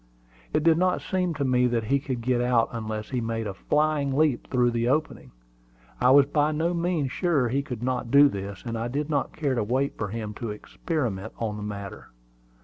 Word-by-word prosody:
It 155 - +1
did 165 0 +4
not 185 0 +2
seem 180 -3 -1
to 140 -1 -1
me 125 -1 +3
that 120 -2 0
he 140 +6 +1
could 130 -3 -4
get 120 0 +1
out 120 -2 +2
unless 110 -1 -5
he 125 -2 -1
made 115 0 -2
a 100 - -3
flying 150 +3 0
leap 150 -5 +1
through 125 -2 +2
the 115 0 0
opening. 155 +4 -1 0.7
I 125 - +5
was 140 +1 +7
by 150 +1 +1
no 165 +3 0
means 170 -6 -1
sure 150 -9 +1
he 135 +4 0
could 125 -4 -6
not 125 -1 -1
do 140 +3 +7
this; 100 -5 -6
and 115 -1 -3
I 115 - -2
did 145 +5 -3
not 140 -2 0
care 145 -4 0
to 120 - 0
wait 130 +6 -1
for 105 - -1
him 105 0 -5
to 115 - -4
experiment 110 - -4
on 110 -2 -3
the 105 - -6
matter. 100 -1 -7
125 Hz, 215 wpm, -26 LUFS, 115-145 Hz, 0.7 s, was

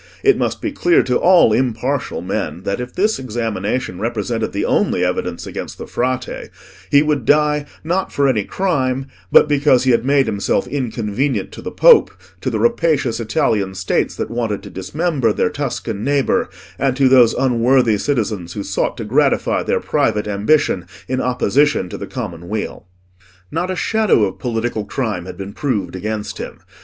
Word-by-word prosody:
It 405 -1 +5
must - - -2
be 320 - -1
clear 175 -11 +3
to 125 -1 +1
all 175 -11 +5
impartial 130 +3 -1
men 80 +5 -3
that 100 +2 -2
if 125 0 -6
this 210 0 +1
examination 115 -4 -3
represented 115 0 -2
the 100 - -2
only - - +1
evidence - - -3
against - - -6
the - - -7
Frate, 125 0 -3 0.4
he 145 +1 +5
would 150 -4 0
die, 150 +2 +2 0.2
not 180 +4 -1
for 140 -1 +2
any 115 -6 +1
crime, 135 - -1 0.3
but - - +7
because 145 -3 +3
he 130 - +3
had 115 - +2
made 135 +1 +3
himself 100 +2 0
inconvenient 120 -3 -2
to - - -9
the - - -5
Pope, - - +6 0.3
to - - -1
the 115 - -2
rapacious 130 +1 +1
Italian 105 -3 0
States 95 0 -1
that - - -4
wanted 115 -4 -2
to - - -10
dismember 130 - -1
their - - 0
Tuscan 120 -6 -4
neighbour, 145 - +1 0.3
and 135 -1 +1
to 135 -1 +4
those 125 -3 +5
unworthy 125 -3 +2
citizens 105 -9 -2
who 100 - -4
sought 95 -1 -2
to - - -4
gratify - - +2
their - - 0
private 105 -1 0
ambition 105 - +1 0.2
in 130 0 -1
opposition 125 -2 +1
to - - -6
the - - -6
common 85 0 -6
weal. 105 -3 -4 0.6
Not 185 - -2
a 185 - -1
shadow 215 - +2
of 95 - -2
political 115 -2 -2
crime 105 -7 -3
had 90 -1 -8
been 100 +1 -7
proved 105 -10 -2
against 105 +2 -4
him. - - -7
120 Hz, 170 wpm, -18 LUFS, 105-140 Hz, 0.6 s, but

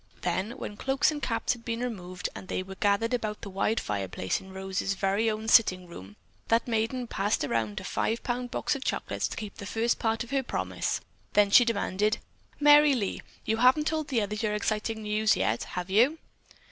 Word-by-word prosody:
Then, 185 +6 -1
when 205 - -6
cloaks 270 +5 +2
and 295 -1 -5
caps 230 -3 0
had 240 -2 -12
been 230 0 -3
removed 185 -7 -4
and 190 - -9
they 185 - -2
were 190 +1 -9
gathered 205 +4 +1
about 215 -3 -2
the 200 - -7
wide 215 +4 +1
fireplace 95 -2 -2
in 190 - -13
Rose's 190 +1 -2
very 195 +4 +1
own 215 0 -3
sitting 185 -5 +5
room, 105 - -11 0.3
that 230 +2 +2
maiden 235 +2 0
passed 205 -4 0
around 115 -6 -1
a - - -9
five 225 +1 -1
pound 245 0 -2
box - - -1
of 275 - -5
chocolates - - -2
to - - -8
keep 210 -2 -6
the 200 - -7
first 230 +2 0
part 225 +1 0
of 240 - -12
her 275 -1 +2
promise; 260 - -2 0.3
then 205 -1 +4
she 245 - +8
demanded: 210 -1 0 0.4
"Merry 295 -1 +7
Lee, 205 -6 -2 0.2
you 220 - +1
haven't 255 +6 +5
told 310 -1 -1
the 235 -5 +1
others 210 +1 -3
your 210 -2 0
exciting 215 +1 -2
news 215 +1 +2
yet, 110 +2 0
have 180 +1 -5
you?" 245 +10 +4
215 Hz, 200 wpm, -28 LUFS, 195-240 Hz, 0.4 s, she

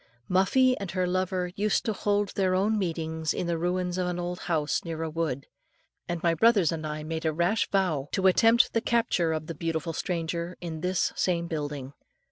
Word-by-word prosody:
Muffie 255 +8 +4
and 200 -3 -5
her 185 0 0
lover 185 0 -1
used 210 0 +1
to 220 - 0
hold 205 0 0
their 185 -1 +1
meetings 160 -6 -1
in - - -2
the 170 0 0
ruins 180 +1 -1
of 180 - 0
an 175 -1 -2
old 175 0 -3
house 155 -4 0
near 165 -1 -4
a 160 - -3
wood, 155 -5 -2 0.6
and 175 0 -3
my 170 -1 +3
brothers 205 -3 +4
and 155 -2 -3
I 150 0 -4
made 160 +1 -4
a 160 - +1
rash 175 +7 +1
vow, 160 -8 0
to 190 - 0
attempt 225 +5 +5
the 230 - +2
capture 230 -9 +1
of 155 -1 -2
the 165 - -5
beautiful 165 +1 -3
stranger 170 +1 -3
in 160 -3 -6
this 180 0 0
same 170 -2 0
building. 145 -4 -4
175 Hz, 195 wpm, -27 LUFS, 160-190 Hz, 0.6 s, attempt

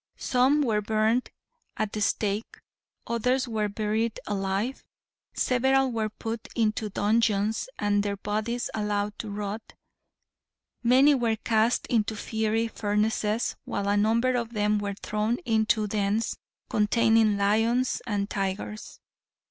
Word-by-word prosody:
Some 265 +4 +3
were 215 -5 +1
burned 220 +3 +1 0.5
at 215 -1 -1
the 215 - -3
stake; 205 +1 -1 0.5
others 250 +3 0
were 215 -2 -1
buried 215 +2 -1
alive; 200 +5 -2 0.5
several 265 +1 +2
were 220 -2 -1
put 225 +1 -6
into 220 -2 0
dungeons 215 - +1
and 205 0 +1
their 200 0 -2
bodies 215 +4 -2
allowed 210 -1 -2
to 220 - -5
rot; 205 +1 -4 1.2
many 260 +5 +5
were 235 -4 +1
cast 220 +1 +1
into 220 -2 0
fiery 220 +1 -1
furnaces, 210 +1 0
while 200 0 -2
a 205 - +2
number 230 +5 +2
of 235 -1 -2
them 210 -1 +1
were 200 -1 -3
thrown 215 +3 0
into 220 -1 +2
dens 210 +1 0 0.3
containing 220 0 +3
lions 225 +5 +2
and 205 -3 -1
tigers. 200 +2 -4
215 Hz, 125 wpm, -27 LUFS, 205-230 Hz, 1.2 s, many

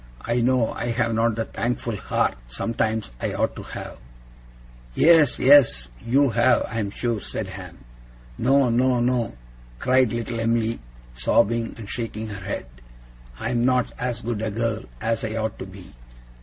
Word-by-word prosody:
I 120 - 0
know 125 -1 +2
I 120 - -4
have 115 -1 0
not 115 0 +2
the 115 0 -2
thankful 120 0 -2
heart, - - 0
sometimes, 110 - -2
I - - -1
ought - - 0
to - - -7
have!' - - -8 1.0
'Yes, 160 -4 +5
yes, 125 - +5
you 135 +3 +3
have, 120 +2 +3
I'm 110 -4 -2
sure,' 115 +1 -2
said - - -5
Ham. - - -10 0.5
'No! 135 - +3
no! 125 +1 +3
no!' 120 - 0 0.4
cried 130 - +3
little 115 0 -3
Em'ly, 115 0 0 0.3
sobbing, 115 - +1
and 110 -3 -8
shaking 110 -1 -4
her 100 -2 -7
head. 100 -8 -4 0.7
'I - - -2
am 120 -1 +1
not 125 -1 +2
as 120 -2 -2
good 115 -3 -3
a 110 - -1
girl 115 +2 -2
as 115 0 -1
I 110 0 -3
ought 110 -1 -2
to 95 - -6
be. 95 -1 -13
115 Hz, 160 wpm, -24 LUFS, 110-125 Hz, 1.0 s, Yes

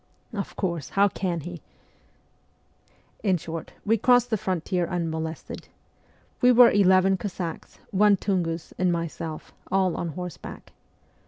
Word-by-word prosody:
' - - -37
Of 200 -3 -4
course, 170 -9 -2
how 200 +1 +3
can 175 -4 -2
he? 175 +1 -8 0.7
' - - -40 0.7
In 190 -4 +3
short, 165 0 -7
we 225 +1 +3
crossed 245 +1 +4
the - - +3
frontier 180 -2 -1
unmolested. 160 -2 -4 0.7
We 250 - +6
were 245 -1 +8
eleven 190 -1 +4
Cossacks, 180 -4 -5
one 205 +1 +5
Tungus, 170 -5 -2
and 180 -1 +3
myself, 165 -2 -4 0.2
all 190 -2 +2
on 175 - -3
horseback. 180 -4 -8
185 Hz, 135 wpm, -26 LUFS, 165-200 Hz, 0.7 s, were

